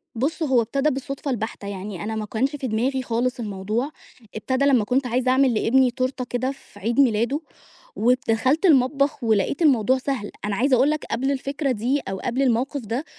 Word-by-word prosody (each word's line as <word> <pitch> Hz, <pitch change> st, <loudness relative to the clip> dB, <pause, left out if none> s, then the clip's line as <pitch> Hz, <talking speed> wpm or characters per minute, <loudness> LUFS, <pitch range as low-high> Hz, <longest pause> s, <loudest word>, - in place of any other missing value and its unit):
بُصّ، 295 Hz, +7 st, -1 dB
هو 260 Hz, -5 st, +3 dB
ابتدى 275 Hz, +6 st, 0 dB
بالصدفة 275 Hz, +1 st, -4 dB
البحتة، 220 Hz, -3 st, -4 dB
يعني 195 Hz, -1 st, -6 dB
أنا 220 Hz, +1 st, -3 dB
ما 215 Hz, -, -3 dB
كانش 260 Hz, +7 st, -1 dB
في 265 Hz, -3 st, -4 dB
دماغي 255 Hz, +4 st, 0 dB
خالص 245 Hz, +2 st, -1 dB
الموضوع. 215 Hz, +6 st, -3 dB, 0.4 s
ابتدى 260 Hz, +5 st, 0 dB
لمّا 260 Hz, -6 st, +4 dB
كنت 255 Hz, +3 st, +1 dB
عايزة 255 Hz, +2 st, +1 dB
أعمل 260 Hz, -2 st, +3 dB
لابني 250 Hz, +3 st, +3 dB
تورتة 255 Hz, +1 st, -2 dB
كده 255 Hz, +2 st, -1 dB
في 240 Hz, -6 st, -15 dB
عيد 230 Hz, +6 st, -1 dB
ميلاده، 240 Hz, +2 st, +2 dB, 0.6 s
ودخلت 250 Hz, -, +2 dB
المطبخ 275 Hz, -3 st, +3 dB
ولقيت 220 Hz, -, +1 dB
الموضوع 260 Hz, -5 st, +4 dB
سهل. 260 Hz, -5 st, -3 dB
أنا 210 Hz, -, -1 dB
عايزة 260 Hz, +4 st, +3 dB
أقول 260 Hz, +4 st, +3 dB
لك 305 Hz, -, -3 dB
قبل 265 Hz, +4 st, -1 dB
الفكرة 275 Hz, +1 st, -2 dB
دي 250 Hz, +5 st, 0 dB
أو 190 Hz, -, -4 dB
قبل 245 Hz, +6 st, -2 dB
الموقف 265 Hz, +2 st, +1 dB
ده، 235 Hz, +7 st, -3 dB
255 Hz, 180 wpm, -23 LUFS, 225-275 Hz, 0.6 s, لمّا